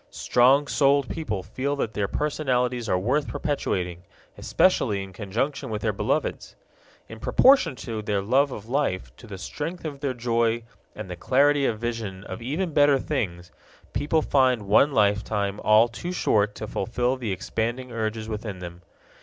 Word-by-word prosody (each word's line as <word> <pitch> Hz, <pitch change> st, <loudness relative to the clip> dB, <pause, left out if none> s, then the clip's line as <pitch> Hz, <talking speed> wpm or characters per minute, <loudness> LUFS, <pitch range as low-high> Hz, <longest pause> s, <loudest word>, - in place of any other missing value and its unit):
Strong 130 Hz, +4 st, +3 dB
souled 140 Hz, -1 st, +2 dB
people 110 Hz, -, -3 dB
feel 130 Hz, +9 st, -2 dB
that 115 Hz, -6 st, -3 dB
their 100 Hz, -1 st, -1 dB
personalities 125 Hz, -5 st, -1 dB
are 90 Hz, -, +2 dB
worth 130 Hz, +10 st, 0 dB
perpetuating, 90 Hz, -, -2 dB, 0.3 s
especially 100 Hz, -2 st, +1 dB
in 95 Hz, -1 st, -11 dB
conjunction 115 Hz, +9 st, -3 dB
with 105 Hz, -1 st, -4 dB
their -, -, +1 dB
beloveds'! -, -, -2 dB, 0.5 s
In 115 Hz, -, -10 dB
proportion 265 Hz, -, +4 dB
to 115 Hz, -3 st, -5 dB
their 105 Hz, -1 st, -1 dB
love 135 Hz, +6 st, +2 dB
of 110 Hz, -3 st, -8 dB
life, 125 Hz, -8 st, -1 dB
to 120 Hz, -, -13 dB
the 100 Hz, -2 st, -7 dB
strength 160 Hz, -, -6 dB
of 145 Hz, -3 st, -5 dB
their 135 Hz, -3 st, -2 dB
joy 115 Hz, -1 st, 0 dB, 0.3 s
and 105 Hz, -2 st, -7 dB
the 90 Hz, -, -6 dB
clarity 140 Hz, +8 st, +3 dB
of 110 Hz, -, -1 dB
vision 110 Hz, -5 st, -4 dB
of -, -, -7 dB
even 155 Hz, +8 st, -2 dB
better 145 Hz, -1 st, +5 dB
things, 90 Hz, -, -3 dB, 0.4 s
people 150 Hz, +5 st, +1 dB
find 130 Hz, -5 st, +2 dB
one 105 Hz, +9 st, +4 dB
lifetime 105 Hz, -2 st, +1 dB
all 110 Hz, +2 st, +6 dB
too 120 Hz, +10 st, -6 dB
short 105 Hz, -, +1 dB
to -, -, -5 dB
fulfill 120 Hz, +5 st, -1 dB
the 120 Hz, -5 st, -4 dB
expanding 115 Hz, +6 st, -3 dB
urges 110 Hz, -1 st, -3 dB
within 105 Hz, -2 st, -5 dB
them. 85 Hz, -1 st, -9 dB
115 Hz, 160 wpm, -25 LUFS, 105-140 Hz, 0.5 s, all